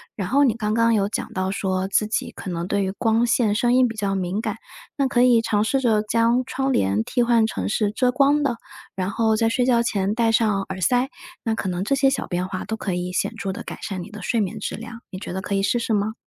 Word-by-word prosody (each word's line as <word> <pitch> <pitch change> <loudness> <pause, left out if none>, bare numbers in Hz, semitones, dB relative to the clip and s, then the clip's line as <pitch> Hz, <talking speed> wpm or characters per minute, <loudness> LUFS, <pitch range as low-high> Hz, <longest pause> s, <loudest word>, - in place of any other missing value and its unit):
然 195 -4 -3
后 280 +3 +4
你 245 -6 +3
刚 215 -2 -1
刚 230 +1 +3
有 200 -2 +1
讲 225 - -4
到 185 -2 -1
说 190 -1 -1
自 210 - +2
己 215 - -2
可 195 - -8
能 170 0 -3
对 200 +1 0
于 190 - -1
光 225 +3 +1
线、 230 -3 +2
声 240 +2 +2
音 255 0 +5
比 230 - -6
较 200 -2 -1
敏 185 +1 -2
感， - - -3 0.4
那 275 -2 +2
可 245 -1 +2
以 245 -2 +5
尝 210 -2 +1
试 270 +5 +1
着 220 -4 +3
将 230 +3 +2
窗 270 +2 -1
帘 100 - +1
替 245 - 0
换 235 -2 +3
成 95 - -3
是 205 - +1
遮 250 +4 +1
光 280 +3 +3
的， 250 -5 0 0.4
然 185 0 -2
后 220 +1 +1
在 225 +1 +2
睡 245 +2 +1
觉 240 -2 +3
前 200 -3 0
戴 230 -1 +2
上 215 -3 +2
耳 190 0 -7
塞。 245 +8 +2 0.3
那 225 -2 0
可 215 - -3
能 180 0 -2
这 245 +7 +1
些 270 0 +4
小 270 - -2
变 180 0 -2
化 185 -1 -5
都 220 - -3
可 195 -4 -3
以 180 0 -3
显 180 - -1
著 195 - -3
地 190 - -7
改 - - -8
善 185 -3 -4
你 205 - -11
的 210 0 -9
睡 230 +5 0
眠 215 +1 -2
质 - - -4
量。 230 +1 -9
你 185 - -7
觉 185 - -6
得 190 - -3
可 200 - -2
以 195 - +1
试 240 +4 +1
试 230 -1 -1
吗？ 210 +1 0
220 Hz, 290 characters per minute, -23 LUFS, 195-235 Hz, 0.4 s, 音